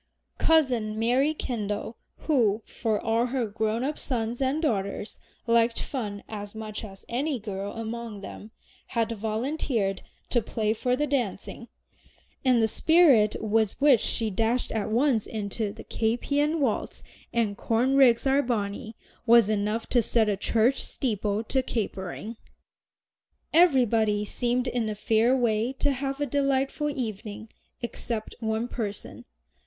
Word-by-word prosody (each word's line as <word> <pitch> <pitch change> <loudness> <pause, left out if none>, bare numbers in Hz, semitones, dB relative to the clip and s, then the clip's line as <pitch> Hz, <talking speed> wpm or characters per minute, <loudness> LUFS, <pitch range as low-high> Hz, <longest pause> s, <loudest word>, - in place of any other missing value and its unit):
Cousin 250 -10 +2
Mary 250 +6 +2
Kendal, 215 -4 -3 0.3
who, 225 -8 +2
for 220 -3 -1
all 230 +2 +1
her 250 -1 -1
grown 220 +2 -1
up 295 +3 -2
sons 240 -1 -2
and 270 +3 +1
daughters 205 -8 -2 0.3
liked 230 0 +3
fun 210 -7 -4
as 205 -1 -7
much 215 -1 -6
as 195 -2 -10
any 275 +4 -1
girl 200 -1 -5
among 225 -2 -5
them, 205 +2 -9 0.5
had 230 0 +1
volunteered 220 -2 -1 0.3
to 240 - +3
play 215 -1 -1
for 250 +3 0
the 295 +3 0
dancing, 240 -4 -3 0.8
and 250 -4 +4
the - - +4
spirit 275 -6 +4
with 220 -1 +1
which 280 -4 +6
she 225 0 -1
dashed 225 +5 0
at 220 -2 -2
once 235 -1 +2
into 210 0 -3
"The 220 - -10
Caspian 285 +8 0
Waltz" 260 -7 -1 0.3
and 225 -4 0
"Corn 240 +6 +1
Rigs 255 -3 +5
are 270 +1 +4
Bonny" 220 -3 -3 0.3
was 230 -2 +6
enough 210 +2 -1
to 245 - +4
set 225 0 +2
a 205 - +1
church 230 +6 +2
steeple 215 -3 -1
to 265 +4 0
capering. 215 -1 -4 1.2
Everybody 230 -10 +4
seemed 245 +3 -1
in 240 -3 -1
a 210 - -3
fair 225 +4 +2
way 230 -1 +1
to 285 +2 0
have 275 +1 -3
a 290 - +1
delightful 275 +1 0
evening 220 -5 -5 0.3
except 230 -2 -4
one 220 +1 -1
person. 215 -4 -5
230 Hz, 140 wpm, -27 LUFS, 215-260 Hz, 1.2 s, which